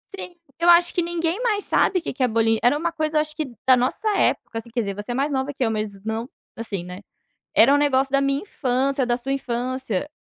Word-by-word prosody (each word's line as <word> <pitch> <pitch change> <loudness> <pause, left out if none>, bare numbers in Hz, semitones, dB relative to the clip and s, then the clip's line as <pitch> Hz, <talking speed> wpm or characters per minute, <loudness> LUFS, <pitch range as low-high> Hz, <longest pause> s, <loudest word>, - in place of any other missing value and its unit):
Sim. 360 -2 -8 0.2
Eu 345 - +3
acho 345 0 +6
que 350 - +1
ninguém 340 +4 -2
mais 420 -4 0
sabe 370 - +2
o - - -12
que - - -5
que 260 - -2
é - - +4
bolinho 225 -1 +2
era 250 +4 +4
uma 335 +2 -1
coisa 310 -2 0
acho 305 0 -2
que 310 -1 -2 0.2
da 255 - +8
nossa 255 - -1
época, 225 - 0
assim 225 +1 -6
quer 235 +1 -3
dizer, 200 -3 -2
você 205 +4 -6
é - - -1
mais 285 +2 0
nova 270 +1 -2
que 270 - -2
eu 230 - +1
mas 210 -2 -4
não 225 +3 -3 0.3
assim, 210 -6 -5
né. 180 +2 -9 0.5
Era 240 +5 +6
um 290 - +4
negócio 270 -2 +2
da 275 - +3
minha 275 +2 0
infância, 265 -5 -1
da 240 - +1
sua 260 +2 -3
infância. 255 -3 -3
265 Hz, 245 wpm, -23 LUFS, 230-305 Hz, 0.5 s, da